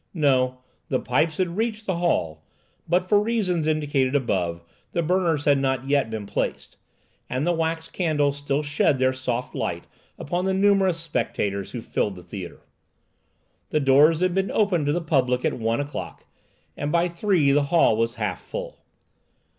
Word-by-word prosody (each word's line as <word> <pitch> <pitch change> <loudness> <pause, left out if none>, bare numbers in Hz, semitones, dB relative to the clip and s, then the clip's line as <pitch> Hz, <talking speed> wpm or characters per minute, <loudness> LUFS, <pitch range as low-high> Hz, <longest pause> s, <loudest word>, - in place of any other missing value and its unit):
No; 130 -5 +2 0.3
the 130 - +1
pipes 155 +5 0
had 180 -1 -1
reached 220 -1 -2
the 190 -3 -1
hall, 80 - 0 0.5
but, 180 +2 +2
for 205 +1 +4
reasons 195 -8 0
indicated 145 -4 +1
above, 90 -10 -1 0.3
the 170 - 0
burners 165 -3 +1
had 140 -1 +4
not 135 -1 -1
yet 140 -4 +2
been 110 -2 -5
placed, - - -3 0.5
and 130 +4 -1
the 175 - +2
wax 165 0 -1
candles 145 -5 0
still 145 +1 -1
shed 145 -1 +2
their 130 0 +2
soft 130 -1 -3
light - - -3 0.3
upon 175 +5 -2
the 190 0 +1
numerous 195 -3 +3
spectators 100 - -2
who 120 - -6
filled 100 -2 -1
the 90 - -11
theatre. 90 0 -9 1.0
The 155 - +1
doors 150 +4 +5
had 185 -1 +2
been 195 +1 0
opened 180 -8 +1
to - - +3
the 175 +3 0
public 130 -6 +1
at - - +1
one 115 +1 -1
o'clock, 145 +1 -6 0.5
and 145 +1 -3
by 170 +2 +3
three 170 -4 +2
the 145 +1 +3
hall 160 -7 +4
was 115 +1 0
half - - -3
full. - - -7
150 Hz, 170 wpm, -24 LUFS, 130-175 Hz, 1.0 s, doors